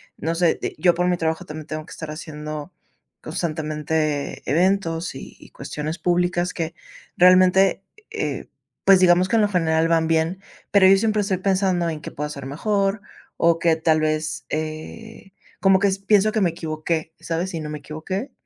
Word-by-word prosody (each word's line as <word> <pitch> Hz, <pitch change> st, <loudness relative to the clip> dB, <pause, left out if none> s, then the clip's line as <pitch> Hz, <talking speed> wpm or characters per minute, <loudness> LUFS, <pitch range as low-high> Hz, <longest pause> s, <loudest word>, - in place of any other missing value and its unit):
no 165 Hz, +2 st, -2 dB
sé, 170 Hz, -1 st, +2 dB
eh, -, -, -4 dB
yo 175 Hz, -2 st, +4 dB
por 180 Hz, +1 st, 0 dB
mi 175 Hz, -, +1 dB
trabajo 160 Hz, +1 st, -1 dB
también 155 Hz, -2 st, -9 dB
tengo 155 Hz, 0 st, -5 dB
que -, -, -15 dB
estar 160 Hz, -2 st, -7 dB
haciendo, 155 Hz, +1 st, -7 dB, 0.5 s
constantemente 155 Hz, -3 st, -2 dB
eventos 170 Hz, 0 st, +1 dB
y -, -, -11 dB
cuestiones 150 Hz, +3 st, -5 dB
públicas 175 Hz, +1 st, 0 dB
que 165 Hz, -1 st, -3 dB, 0.4 s
realmente, 185 Hz, +2 st, +5 dB, 0.3 s
eh, -, -, -3 dB, 0.4 s
pues 195 Hz, -1 st, +7 dB
digamos 180 Hz, 0 st, +4 dB
que -, -, +1 dB
en -, -, +4 dB
lo 210 Hz, -, +3 dB
general 165 Hz, -3 st, +2 dB
van 165 Hz, -1 st, +2 dB
bien, 165 Hz, +3 st, 0 dB, 0.3 s
pero 195 Hz, -2 st, +6 dB
yo 195 Hz, -, +7 dB
siempre 215 Hz, 0 st, +1 dB
estoy 195 Hz, -2 st, -1 dB
pensando 185 Hz, -2 st, +1 dB
en 155 Hz, -1 st, -5 dB
que -, -, -8 dB
pueda 150 Hz, +1 st, -4 dB
ser 140 Hz, -2 st, -7 dB
mejor 200 Hz, +7 st, -1 dB, 0.4 s
o 165 Hz, 0 st, +3 dB
que 165 Hz, -1 st, +3 dB
tal 160 Hz, -1 st, +2 dB
vez, 155 Hz, 0 st, -1 dB
eh, 155 Hz, +7 st, -6 dB, 0.3 s
como 190 Hz, -1 st, +5 dB
que 200 Hz, 0 st, +3 dB, 0.2 s
pienso 210 Hz, +1 st, +4 dB
que 220 Hz, -, +1 dB
me 180 Hz, -, +3 dB
equivoqué, 160 Hz, 0 st, -3 dB
¿sabes?, 170 Hz, +3 st, -3 dB
y 165 Hz, -, -3 dB
no 150 Hz, -, -6 dB
me 150 Hz, -1 st, -5 dB
equivoqué. 185 Hz, -, -5 dB
165 Hz, 175 wpm, -22 LUFS, 155-185 Hz, 0.5 s, pues